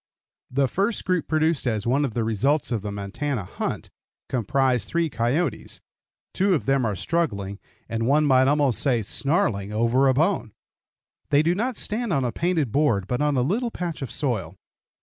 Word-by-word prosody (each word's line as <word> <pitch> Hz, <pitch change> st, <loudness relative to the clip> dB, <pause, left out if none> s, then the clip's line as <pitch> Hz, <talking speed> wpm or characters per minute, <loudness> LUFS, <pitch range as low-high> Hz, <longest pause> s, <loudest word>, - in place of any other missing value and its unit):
The 135 Hz, +1 st, +1 dB
first 200 Hz, -, -1 dB
group 180 Hz, -3 st, 0 dB
produced 155 Hz, -3 st, +1 dB
as 110 Hz, -4 st, -1 dB
one 135 Hz, +5 st, +2 dB
of 120 Hz, -, -5 dB
the 120 Hz, -, 0 dB
results 125 Hz, +7 st, +1 dB
of 115 Hz, -4 st, 0 dB
the 105 Hz, 0 st, -4 dB
Montana 105 Hz, +5 st, -3 dB
hunt 90 Hz, -, -5 dB, 0.4 s
comprised 125 Hz, +1 st, +1 dB
three 165 Hz, -2 st, 0 dB
coyotes. 125 Hz, +10 st, -1 dB, 0.5 s
Two 195 Hz, -1 st, +2 dB
of 150 Hz, -, -2 dB
them 135 Hz, -3 st, +2 dB
are 105 Hz, -, -1 dB
struggling, 100 Hz, -, -2 dB, 0.3 s
and 115 Hz, 0 st, -2 dB
one 150 Hz, +3 st, +4 dB
might 130 Hz, -2 st, +4 dB
almost 145 Hz, -4 st, +2 dB
say 125 Hz, -6 st, +1 dB
snarling, 105 Hz, -, 0 dB
over 115 Hz, +5 st, +2 dB
a 130 Hz, -, +3 dB
bone. 160 Hz, -, +1 dB, 0.8 s
They 145 Hz, +1 st, +4 dB
do 170 Hz, +2 st, +2 dB
not 235 Hz, +5 st, -2 dB
stand 230 Hz, 0 st, -1 dB
on 135 Hz, -5 st, +1 dB
a 120 Hz, -, -1 dB
painted 160 Hz, -3 st, 0 dB
board, 125 Hz, -9 st, +2 dB
but 125 Hz, +7 st, -2 dB
on 150 Hz, -2 st, +1 dB
a 125 Hz, -, +3 dB
little 225 Hz, -, 0 dB
patch 175 Hz, -8 st, -5 dB
of 135 Hz, -, -4 dB
soil. 110 Hz, -, -2 dB
135 Hz, 180 wpm, -24 LUFS, 115-160 Hz, 0.8 s, one